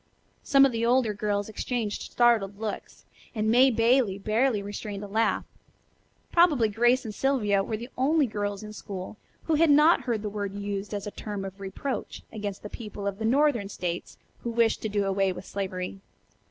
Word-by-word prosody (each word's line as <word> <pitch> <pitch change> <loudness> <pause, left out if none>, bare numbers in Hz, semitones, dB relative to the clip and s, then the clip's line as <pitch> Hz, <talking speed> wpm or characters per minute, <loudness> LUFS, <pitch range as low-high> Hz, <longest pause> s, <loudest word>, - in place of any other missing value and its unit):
Some 275 0 +5
of 270 - +2
the 230 -1 -2
older 240 -2 +3
girls 205 -1 -1
exchanged 220 0 -3
startled 225 -5 +3
looks, 215 -2 -6 0.3
and 215 0 +1
May 255 +3 +6
Bailey 230 -3 +3
barely 215 +2 +1
restrained 205 0 -6
a - - -6
laugh. 220 +3 +1 0.9
Probably 300 -10 +4
Grace 240 +4 +2
and 215 - -5
Sylvia 210 -7 +1
were 215 +2 -3
the 240 +4 -9
only 290 +4 +3
girls 205 -3 -3
in 215 0 -8
school 195 -1 -7 0.3
who 325 - 0
had 320 +1 +4
not 300 +4 +6
heard 230 -4 -2
the - - -2
word 200 -1 -4
used 200 0 -4
as 200 - -4
a 205 - -5
term 205 -2 -5
of 195 +1 -8
reproach 200 +7 -5
against 205 -3 -5
the - - -5
people 210 -2 -8
of 200 0 -3
the 220 - -2
northern 250 -4 +2
states 175 -3 -4 0.2
who 235 - -4
wished 230 -1 +2
to 220 - -2
do 205 -1 0
away 195 0 +1
with 180 - -8
slavery. 190 -1 -4
215 Hz, 185 wpm, -27 LUFS, 200-240 Hz, 0.9 s, May